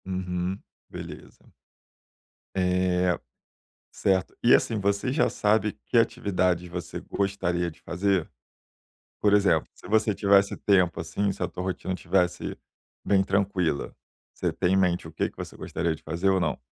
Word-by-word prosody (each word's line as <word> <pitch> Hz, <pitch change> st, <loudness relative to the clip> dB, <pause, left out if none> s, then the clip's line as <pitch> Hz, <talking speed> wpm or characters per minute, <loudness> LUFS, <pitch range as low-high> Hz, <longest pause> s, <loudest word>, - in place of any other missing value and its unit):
Uhum, 90 Hz, 0 st, -3 dB, 0.3 s
beleza. -, -, -10 dB, 1.0 s
É, 90 Hz, -1 st, +2 dB, 0.7 s
certo. 95 Hz, -2 st, 0 dB
E, -, -, +7 dB
assim, 110 Hz, -, 0 dB
você 100 Hz, +5 st, 0 dB
já 155 Hz, +4 st, +2 dB
sabe 105 Hz, 0 st, +1 dB
que 120 Hz, -, +1 dB
atividades 95 Hz, -7 st, +1 dB
você 90 Hz, -1 st, -6 dB
gostaria 90 Hz, -3 st, -1 dB
de 80 Hz, -, -17 dB
fazer? 95 Hz, -1 st, 0 dB, 0.9 s
Por 105 Hz, -, +3 dB
exemplo, 100 Hz, -6 st, +3 dB
se -, -, -14 dB
você 110 Hz, +1 st, +3 dB
tivesse 100 Hz, 0 st, +3 dB
tempo, 90 Hz, -5 st, +2 dB
assim, 100 Hz, +5 st, -1 dB
se 95 Hz, -, -13 dB
a -, -, +2 dB
tua 90 Hz, +1 st, -6 dB
rotina 95 Hz, 0 st, -3 dB
estivesse 90 Hz, -1 st, 0 dB, 0.5 s
bem 100 Hz, -1 st, +3 dB
tranquila, 95 Hz, -6 st, 0 dB, 0.4 s
você 90 Hz, -2 st, -1 dB
tem 90 Hz, +3 st, +1 dB
em -, -, +4 dB
mente 90 Hz, -3 st, +1 dB
o 80 Hz, -, -9 dB
que 80 Hz, -, -1 dB
que -, -, -31 dB
você -, -, -7 dB
gostaria 85 Hz, -1 st, -2 dB
de 80 Hz, -, -13 dB
fazer 85 Hz, +5 st, -1 dB
ou 95 Hz, -1 st, +2 dB
não? -, -, 0 dB
95 Hz, 150 wpm, -26 LUFS, 90-100 Hz, 1.0 s, E